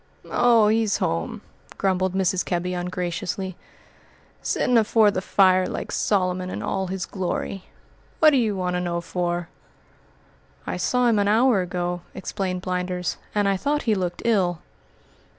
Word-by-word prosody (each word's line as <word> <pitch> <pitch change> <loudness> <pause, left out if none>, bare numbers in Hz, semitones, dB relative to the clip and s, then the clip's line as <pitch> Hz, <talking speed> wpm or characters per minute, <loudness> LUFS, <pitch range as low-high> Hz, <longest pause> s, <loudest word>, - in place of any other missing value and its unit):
"Oh, 235 -3 +5
he's 220 -2 +2
home," 85 0 -2 0.4
grumbled 185 -1 0
Mrs. 190 -1 +1
Kebby 180 0 -2
ungraciously, 180 +1 -3 0.9
"sittin' 250 - +1
afore 215 -1 +4
the 185 - -2
fire 185 -1 +4
like - - -5
Solomon 185 -2 0
in - - -5
all 190 -1 -1
his 185 -1 -3
glory. 190 0 -4 0.5
What 310 -1 +6
d'ye 240 -6 +2
want 180 -2 -2
to 180 - 0
know 175 -1 -1
for?" 175 0 -2 1.2
"I - - -3
saw 250 0 +1
him 225 -3 +3
an 200 - +2
hour 225 0 +4
ago," 175 0 -3
explained 185 -1 -3
Blinders, 180 -1 -2 0.2
"and 205 -1 +2
I 195 -1 +2
thought 295 +8 -1
he 225 - +2
looked 180 -3 -2
ill." 185 -7 +1
185 Hz, 145 wpm, -24 LUFS, 180-210 Hz, 1.2 s, What